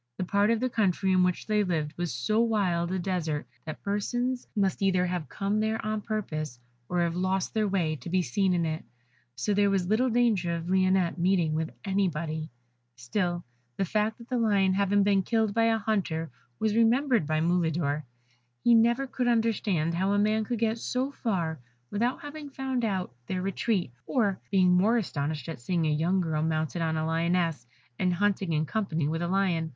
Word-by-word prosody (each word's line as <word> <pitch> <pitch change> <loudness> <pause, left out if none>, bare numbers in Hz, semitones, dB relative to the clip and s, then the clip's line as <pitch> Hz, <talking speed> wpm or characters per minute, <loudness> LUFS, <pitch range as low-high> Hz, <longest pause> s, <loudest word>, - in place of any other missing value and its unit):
The - - -1
part 200 +3 +2
of 230 -1 +2
the 255 - +1
country 195 -5 +1
in 185 -1 +4
which 180 -1 +1
they 210 -1 +2
lived 160 -5 -1
was 175 -1 -2
so 125 - 0
wild 185 -7 +1
a 190 - 0
desert 170 -5 -2 0.2
that 155 - -7
persons 245 +5 -1
must 195 -2 0
either 185 -2 +3
have 175 -3 -3
come 200 +1 -1
there 220 +1 0
on 215 0 -1
purpose, 155 - -4 0.3
or 180 -1 +1
have 170 -1 0
lost 185 +1 -1
their 215 -1 +1
way, 175 -5 0
to 170 - -8
be 185 +1 +2
seen 180 +8 +1
in 170 -1 +1
it, 155 0 -3 0.5
so 130 +11 -1
there 200 0 +3
was 195 -2 +1
little 220 +7 +2
danger 220 -8 +2
of 165 0 -5
Lionette 185 -2 +2
meeting 175 -3 +2
with 160 +1 -1 0.2
anybody. 165 -5 -1 0.5
Still, 175 - -2 0.3
the 195 - +1
fact 215 +4 0
of 235 - -12
the 250 -1 -1
Lion 200 -4 +3
having 200 +1 +3
been 200 -1 +3
killed 220 +1 0
by 225 +1 +3
a 225 0 +3
hunter 185 -8 -1 0.3
was 215 -1 0
remembered 235 - +3
by 155 0 +1
Mulidor. 160 -3 +1 0.6
He 240 - +5
never 235 +4 +4
could 255 -1 -2
understand 210 -8 +1
how 190 +4 +1
a - - +2
man 215 +1 +2
could 240 +2 -2
get 225 +1 0
so 255 +4 -2
far 175 - -2 0.3
without 240 +7 -1
having 290 0 -7
found 265 -2 -2
out 190 - -1
their 185 -1 -2
retreat, 195 - -1 0.2
or 205 -7 +1
being 185 -2 +4
more 200 +7 +4
astonished 150 -7 -3
at 160 -6 -6
seeing 165 +7 -1
a 155 - +2
young 175 +5 +1
girl 160 -3 -1
mounted 160 +1 -1
on 160 -1 0
a 155 - -1
Lioness, 165 -4 0 0.3
and 180 -1 +1
hunting 195 -2 0
in 155 0 +1
company 165 -6 -1
with 165 +2 -2
a 170 - -1
Lion. 175 -4 +1
190 Hz, 195 wpm, -28 LUFS, 165-215 Hz, 0.6 s, He